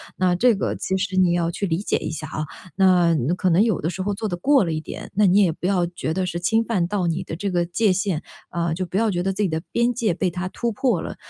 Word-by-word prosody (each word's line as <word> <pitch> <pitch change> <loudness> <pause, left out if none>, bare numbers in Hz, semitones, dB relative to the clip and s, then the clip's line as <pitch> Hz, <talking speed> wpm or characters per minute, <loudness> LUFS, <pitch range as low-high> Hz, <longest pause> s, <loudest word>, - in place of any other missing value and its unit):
那 180 -1 +2
这 240 +4 +4
个 195 - -2
其 190 - -2
实 190 0 -2
你 180 -2 +4
要 170 -1 0
去 200 - -3
理 160 -2 0
解 205 - 0
一 - - -4
下 155 -1 -5
啊， 155 +1 -4 0.3
那 180 -3 +4 0.2
可 185 - +1
能 175 +4 +4
有 220 -5 +2
的 160 - -1
时 185 - -5
候 205 +2 -1
做 220 +2 -3
得 175 -3 -3
过 275 +5 +4
了 170 - -2
一 155 - -1
点， - - -8
那 210 +1 +3
你 190 +2 +5
也 185 -4 +3
不 175 +3 -4
要 185 -3 +2
觉 170 -2 -4
得 185 +2 -1
是 175 -1 -3
侵 225 +6 +2
犯 195 -7 0
到 195 -2 -1
你 170 +2 -1
的 160 - -6
这 200 +3 -3
个 175 -1 +1
界 195 +4 +1
限， 185 -3 -1 0.3
呃， 170 -2 -1
就 185 +2 -2
不 180 - -9
要 220 -1 +2
觉 175 -1 -1
得 195 +1 -1
自 210 - -1
己 190 - +1
的 160 0 -2
边 235 +1 +2
界 220 -5 0
被 180 +1 -1
他 180 +2 -4
突 235 +3 -2
破 220 -5 0
了。 - - -6
185 Hz, 315 characters per minute, -22 LUFS, 175-205 Hz, 0.3 s, 你